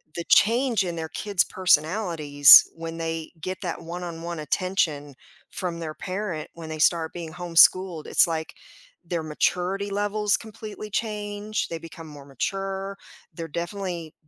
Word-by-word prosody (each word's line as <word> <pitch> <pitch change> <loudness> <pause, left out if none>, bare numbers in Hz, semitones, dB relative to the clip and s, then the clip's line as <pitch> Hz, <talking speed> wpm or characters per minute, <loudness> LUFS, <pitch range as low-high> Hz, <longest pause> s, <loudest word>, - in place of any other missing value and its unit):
the 170 - -3
change 235 -1 +4
in 175 -2 -4
their 160 -1 -5
kids' 200 -4 0
personalities 160 -5 +5
when 165 0 -6
they 165 -1 -4
get 185 +3 -4
that 175 -3 -4
one-on-one 170 -1 -6
attention 155 -3 -1 0.4
from 175 -3 -4
their 155 -2 -5
parent 185 -5 -5
when 165 -1 -9
they 155 0 -5
start 160 0 +2
being 165 -2 -7
homeschooled, 175 0 +3
it's - - +5
like 160 -1 -3 0.5
their 170 -2 -2
maturity 180 +6 -1
levels 205 +1 +1
completely 215 -1 -9
change, 210 0 -3
they 165 - -4
become 165 0 -11
more 145 -2 -12
mature 195 +7 -4 0.4
they're 165 0 -5
definitely 170 0 -5
175 Hz, 140 wpm, -25 LUFS, 160-195 Hz, 0.5 s, personalities